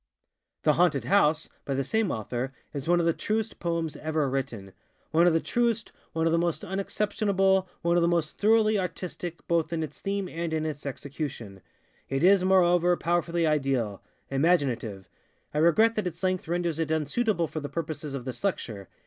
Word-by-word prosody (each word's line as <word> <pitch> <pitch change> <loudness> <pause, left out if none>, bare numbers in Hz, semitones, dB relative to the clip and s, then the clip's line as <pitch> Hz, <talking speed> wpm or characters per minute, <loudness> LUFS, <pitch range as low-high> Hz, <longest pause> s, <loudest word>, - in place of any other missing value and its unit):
ŌĆ£The 150 - +5
Haunted 150 -6 +2
House, 155 -1 +3
ŌĆØ - - -18 0.2
by 140 - -2
the 135 - 0
same 220 - 0
author, 120 +3 -3 0.2
is 140 0 -5
one 175 0 +4
of 170 - +1
the 165 - +3
truest 220 +4 -2
poems 170 -3 -2
ever 155 -2 0
written, 130 -8 -4 0.4
ŌĆöone 170 +2 +5
of 175 - +4
the 165 - +3
truest, 235 +2 0 0.2
one 160 0 0
of 165 - +3
the 165 - +3
most 170 -2 -1
unexceptionable, 195 -1 +1
one 170 +1 +3
of - - +4
the 170 - +3
most 170 -3 0
thoroughly 215 0 +4
artistic, 180 -2 -5
both 165 -1 +1
in 165 -1 -1
its 150 -2 -8
theme 195 -1 -2
and 165 -1 -4
in 155 0 -1
its 150 -2 -4
execution. 135 - -6 0.5
It 135 +3 -1
is, 190 0 +6
moreover, 180 -2 +4
powerfully 170 0 0
idealŌĆöimaginative. 135 - 0 0.5
I 150 - 0
regret 215 +8 +5
that 215 -4 -1
its 170 +1 -7
length 185 -2 0
renders 170 -1 -1
it 160 -2 -1
unsuitable 170 +5 +1
for 155 - -5
the 145 -1 -5
purposes 155 -3 -4
of 130 -3 -6
this 130 +6 -6
lecture. 110 - -2
165 Hz, 185 wpm, -27 LUFS, 145-185 Hz, 0.5 s, is